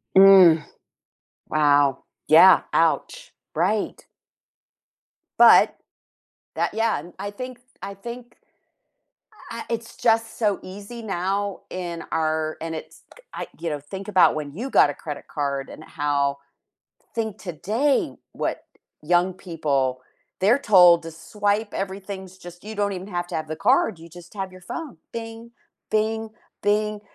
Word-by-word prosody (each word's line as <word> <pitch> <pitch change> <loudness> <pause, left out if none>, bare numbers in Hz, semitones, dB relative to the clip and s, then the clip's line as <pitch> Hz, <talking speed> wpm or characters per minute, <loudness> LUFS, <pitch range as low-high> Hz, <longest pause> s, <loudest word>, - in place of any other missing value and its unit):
Mm. 190 -5 +8 0.9
Wow. 145 -3 +3 0.2
Yeah, - - +8
ouch. - - 0 0.2
Right. - - -1 1.4
But - - +7 0.8
that, 170 +4 -1
yeah, 225 -5 +1
and 175 +4 -12
I 200 +1 -4
think 255 +2 -8 0.2
I 200 +1 -6
think, 240 +4 -9 1.2
uh, - - -5
it's 230 0 -5
just 225 -1 +1
so 210 -3 +1
easy 205 +5 -9
now 195 0 -2
in 175 -2 -5
our 155 -1 -1
and 165 0 -4
it's 160 - -10 0.3
I - - -5
you 170 - -3
know, 150 -2 -3
think 190 +8 -8
about 190 -3 +4
when 150 -2 -4
you 250 +7 -4
got 145 - +5
a - - -3
credit 150 0 -8
card 140 -2 -3
and 155 - -11
how 140 -2 -1 0.8
think 220 -2 -3
today 215 - -1 0.2
what - - -3 0.4
young 175 +3 +2
people 140 -8 -1 0.4
they're 220 +8 +4
told 180 -9 +6
to 165 - -7
swipe, 205 +6 -2
everything's 190 -1 -6
just 175 +1 -12
you 220 +1 -7
don't 205 -1 0
even 185 +2 -6
have 175 -2 -3
to - - -7
have 155 -1 -3
the 155 - -4
card, 200 -2 +2
you 165 +1 -12
just 175 +3 -14
have 190 -2 -5
your 185 - -13
phone, 300 - -7 0.2
"Bing, 225 0 -7 0.4
bing, 220 +1 0 0.3
bing." 210 0 +1
190 Hz, 140 wpm, -23 LUFS, 160-215 Hz, 1.4 s, Mm